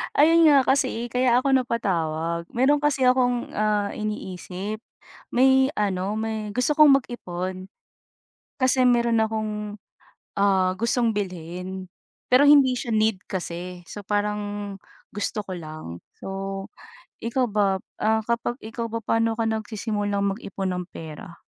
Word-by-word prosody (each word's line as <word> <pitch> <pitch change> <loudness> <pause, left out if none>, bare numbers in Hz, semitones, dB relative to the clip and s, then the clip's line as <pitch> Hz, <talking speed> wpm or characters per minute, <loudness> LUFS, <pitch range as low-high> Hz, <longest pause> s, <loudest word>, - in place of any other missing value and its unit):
Ayon 330 +3 +6
nga 295 -3 +7
kasi, 260 -3 +1
kaya 250 0 +3
ako 270 +1 +2
napatawag, 170 -9 -1
mayroon 285 +4 +2
kasi 275 -3 +3
akong, 250 -1 +2
ah, 210 -1 0
iniisip. 210 0 -5 0.5
May 265 +1 +5
ano, 195 -1 -1
may 220 -1 -3
gusto 250 +5 +1
kong 300 -2 +8
mag-ipon, 185 -5 -6 0.9
kasi 260 0 +2
mayroon 235 -2 +3
akong, 220 -1 -1 0.9
ah, 190 -2 +3
gustong 235 0 +2
bilhin, 185 -1 -5 0.4
pero 265 +3 +6
hindi 270 -4 +6
siya 230 -2 -2
need 215 -2 +2
kasi, 180 -1 -5
so 200 +3 -10
parang 205 -1 -2 0.3
gusto 205 +1 -3
ko 195 - -9
lang, 155 - -7 0.2
So, 195 +1 -6 0.5
ikaw 245 +2 0
ba, 200 -2 +1 0.2
ah, 220 +1 +2
kapag 235 +2 -1
ikaw 230 +1 -5
ba 230 - -2
paano 225 +1 +1
ka 225 0 -1
nagsisimulang 205 -2 -1
mag-ipon 195 -4 -4
ng 180 - -3
pera? 165 +2 -9
215 Hz, 130 wpm, -24 LUFS, 190-240 Hz, 0.9 s, kong